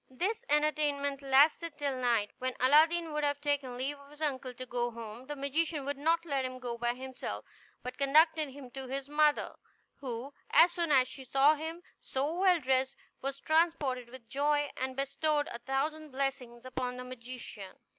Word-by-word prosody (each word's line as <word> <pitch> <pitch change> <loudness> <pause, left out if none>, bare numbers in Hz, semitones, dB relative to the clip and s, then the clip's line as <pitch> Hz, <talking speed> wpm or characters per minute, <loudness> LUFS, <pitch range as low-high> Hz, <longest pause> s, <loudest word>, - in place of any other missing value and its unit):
This 370 - -1
entertainment 290 -2 +1
lasted 290 +4 +4
till 285 -3 -1
night, 235 -5 +1
when 255 0 -2
Aladdin 315 +5 +4
would 300 0 -1
have 285 -1 +1
taken 285 -4 -1
leave 280 +3 -3
of 280 0 -16
his 295 +1 -15
uncle 265 -3 -2
to 255 +1 -8
go 240 -1 -1
home; 230 +1 -9
the 295 - -4
magician 290 +1 -1
would 285 0 -3
not 330 +3 +2
let 280 -4 0
him 255 0 -4
go 245 -2 -4
by 240 +1 -1
himself, 260 0 -6 0.4
but 250 +1 -6
conducted 310 +2 +4
him 265 -2 -11
to 265 +1 -6
his 270 +1 -4
mother, 295 0 +2 0.4
who, 260 +1 -5 0.2
as 340 +1 +7
soon 340 -2 -1
as 260 -2 +5
she 265 - -8
saw 270 +4 +5
him 320 +3 -6 0.2
so 280 +4 -1
well 365 -1 +4
dressed, 265 -1 +1 0.3
was 275 +1 -3
transported 310 -7 +1
with 245 -2 -12
joy, 290 +3 +1
and 260 0 -3
bestowed 290 +2 0
a 235 - -5
thousand 300 +5 -2
blessings 260 -3 -3
upon 250 -1 -3
the 250 - -5
magician. 245 -5 -8
275 Hz, 180 wpm, -31 LUFS, 255-300 Hz, 0.4 s, as